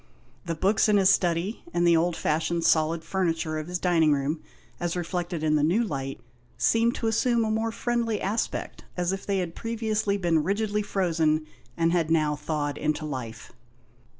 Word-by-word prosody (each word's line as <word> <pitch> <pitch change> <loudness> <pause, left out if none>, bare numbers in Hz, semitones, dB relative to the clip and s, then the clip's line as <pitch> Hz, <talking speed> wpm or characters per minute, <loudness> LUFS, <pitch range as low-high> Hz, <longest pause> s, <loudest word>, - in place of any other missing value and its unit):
The 165 -1 -2
books 195 +6 +2
in 210 - +5
his 195 -1 +5
study, 180 +3 0
and 175 0 +3
the 170 -1 +5
old 170 +1 +2
fashioned 165 +2 0
solid 160 0 +2
furniture 165 -3 -1
of 155 - -6
his 180 0 -2
dining 170 -4 +3
room, 145 +3 -1 0.4
as 175 0 -2
reflected 175 -1 -3
in 155 -1 +2
the 145 - +1
new 185 +10 +3
light, 135 -8 -4 0.4
seemed 230 +1 +2
to - - -4
assume 230 +1 +2
a 215 - -1
more 225 +1 0
friendly 230 -2 -1
aspect, 210 +4 -3
as 180 +1 0
if 195 - -6
they 200 -1 +1
had 175 -3 -2
previously 220 -2 -1
been 170 -4 +2
rigidly 205 +4 0
frozen, 165 -6 +1 0.3
and 165 0 +2
had 170 -2 +1
now 155 -2 +2
thawed 150 -1 -3
into 155 0 -1
life. 125 -6 -6
175 Hz, 180 wpm, -26 LUFS, 155-205 Hz, 0.4 s, in